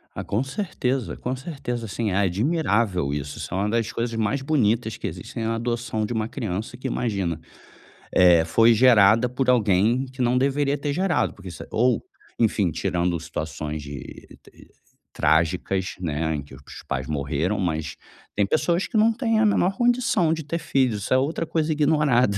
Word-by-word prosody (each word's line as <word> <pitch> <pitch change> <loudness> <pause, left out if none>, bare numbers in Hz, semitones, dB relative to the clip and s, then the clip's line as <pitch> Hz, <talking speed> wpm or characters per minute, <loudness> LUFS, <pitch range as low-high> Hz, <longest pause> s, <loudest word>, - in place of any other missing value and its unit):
Ah, - - -4
com 105 - -1
certeza, 135 - -2
com 125 +1 -3
certeza, 130 -4 -5
assim, 110 +1 -2
é - - -1
admirável 100 - +1
isso 70 0 -5
isso - - -6
é - - -1
uma 100 +2 0
das 115 0 0
coisas 115 0 -3
mais 115 +5 0
bonitas 120 -6 +1
que - - -8
existem 115 - -5
na 115 +1 0
adoção 115 -1 -2
de 105 - -3
uma 110 -1 -1
criança 110 -1 -4
que 130 +2 -5
imagina, 100 -10 -2 0.7
eh, 90 -2 +6
foi 115 +8 +4
gerada 115 -1 +5
por 125 +1 -1
alguém, 110 +2 +2
que 130 0 -17
não 125 +1 +2
deveria 140 +1 +1
ter 145 0 -2
gerado, 185 +2 0
porque 95 -2 -10
isso 85 - -8
ou, 120 +1 +1 0.4
enfim, 105 -5 +2
tirando 85 +2 -1
situações 80 -2 -5
de 70 -1 -10 0.8
trágicas 90 +4 +1
não 85 -5 -3
é, 80 +1 -1
em 75 - -3
que 70 -2 -13
os 65 - -15 0.3
pais 65 0 -2
morreram 75 +6 -1
mas 80 -4 -2 0.4
tem 100 - +2
pessoas 170 - +1
que 230 - -2
não 220 +2 +4
têm 225 -2 0
a 220 - +4
menor 195 -2 +2
condição 240 -9 +2
de 160 - -3
ter 155 +3 -3
filhos, 125 - 0
isso - - 0
é - - +5
outra 150 +5 -1
coisa 160 -1 -1
ignorada, 145 -8 +2
115 Hz, 180 wpm, -24 LUFS, 90-135 Hz, 0.8 s, eh